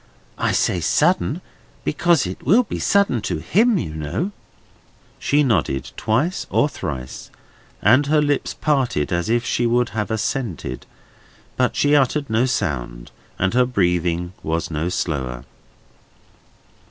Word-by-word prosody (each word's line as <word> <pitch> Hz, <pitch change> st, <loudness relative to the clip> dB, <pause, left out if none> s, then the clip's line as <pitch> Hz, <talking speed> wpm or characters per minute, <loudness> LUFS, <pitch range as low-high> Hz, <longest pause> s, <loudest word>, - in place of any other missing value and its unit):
I -, -, +1 dB
say 90 Hz, -, +1 dB
sudden, 160 Hz, -, +1 dB, 0.4 s
because 170 Hz, -, +2 dB
it 90 Hz, +1 st, -6 dB
will 210 Hz, -, +5 dB
be 215 Hz, -, -5 dB
sudden 200 Hz, -, +2 dB
to 90 Hz, -4 st, -2 dB
him, 200 Hz, -, +2 dB
you 80 Hz, -, -3 dB
know." 80 Hz, -, -3 dB, 0.9 s
She 145 Hz, +1 st, +2 dB
nodded 85 Hz, -, 0 dB
twice 135 Hz, +12 st, 0 dB
or 145 Hz, -, +3 dB
thrice, 65 Hz, -, -6 dB, 0.5 s
and 130 Hz, +8 st, +5 dB
her 155 Hz, +1 st, +3 dB
lips 145 Hz, -1 st, 0 dB
parted 130 Hz, -, 0 dB
as 85 Hz, +3 st, -1 dB
if 120 Hz, +1 st, +1 dB
she 120 Hz, -2 st, +1 dB
would 120 Hz, +1 st, +2 dB
have 105 Hz, -1 st, -3 dB
assented. 110 Hz, -, -3 dB, 0.7 s
But -, -, +1 dB
she 145 Hz, +1 st, +3 dB
uttered 140 Hz, -1 st, +1 dB
no 115 Hz, +4 st, +2 dB
sound, -, -, -3 dB, 0.3 s
and 95 Hz, +2 st, 0 dB
her 125 Hz, 0 st, +3 dB
breathing 90 Hz, -5 st, 0 dB
was 80 Hz, +2 st, -2 dB
no 80 Hz, +3 st, -1 dB
slower. 65 Hz, -8 st, -3 dB
110 Hz, 135 wpm, -21 LUFS, -, 0.9 s, will